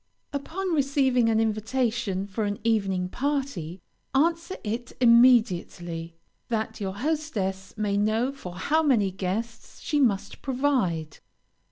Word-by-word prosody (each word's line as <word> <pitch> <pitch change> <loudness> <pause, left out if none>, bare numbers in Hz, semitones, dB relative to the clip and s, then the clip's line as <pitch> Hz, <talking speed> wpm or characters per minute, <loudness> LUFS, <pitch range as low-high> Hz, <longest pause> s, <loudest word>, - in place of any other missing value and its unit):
Upon 345 +6 -3
receiving 270 -5 +2
an 220 -1 +3
invitation 220 -2 0
for 205 +2 -3
an 205 0 -2
evening 195 -5 +1
party, 250 - -3 0.3
answer 335 +5 +1
it 230 +3 -4
immediately, 205 -9 +3 0.3
that 220 -2 -2
your 190 -1 -3
hostess 205 -9 -2
may 205 -1 0
know 220 +5 +1
for 185 -11 -9
how 300 - +1
many 235 -11 +3
guests 205 +6 -4
she 295 - -1
must 205 -7 0
provide. 245 - 0
225 Hz, 120 wpm, -26 LUFS, 195-270 Hz, 0.3 s, an